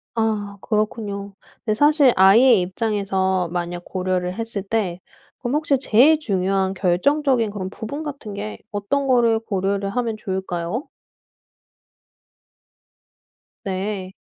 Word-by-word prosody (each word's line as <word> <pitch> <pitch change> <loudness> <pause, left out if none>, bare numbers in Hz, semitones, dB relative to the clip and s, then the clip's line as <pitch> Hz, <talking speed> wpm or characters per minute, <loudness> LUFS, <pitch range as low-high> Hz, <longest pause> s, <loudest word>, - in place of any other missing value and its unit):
아 210 -3 -1
그렇군요. 210 -2 -2 0.3
근데 215 - +1
사실 290 +1 +4
아이의 210 +4 +6
입장에서 190 -2 -1
만약 175 0 -3
고려를 180 -1 -2
했을 225 0 -4
때 195 -3 -2 0.4
그럼 245 +2 -2
혹시 295 -3 +1
제일 280 +6 +5
중요한 195 -5 0
결정적인 235 +7 +2
그런 195 -2 -5
부분 280 +10 -6
같은 275 -9 -7
게 210 +1 -6
어떤 270 +8 -1
거를 235 -3 +3
고려를 200 -2 -1
하면 230 +1 -1
좋을까요? 190 - -3 2.8
네. 190 0 -3
205 Hz, 245 characters per minute, -22 LUFS, 190-235 Hz, 2.8 s, 아이의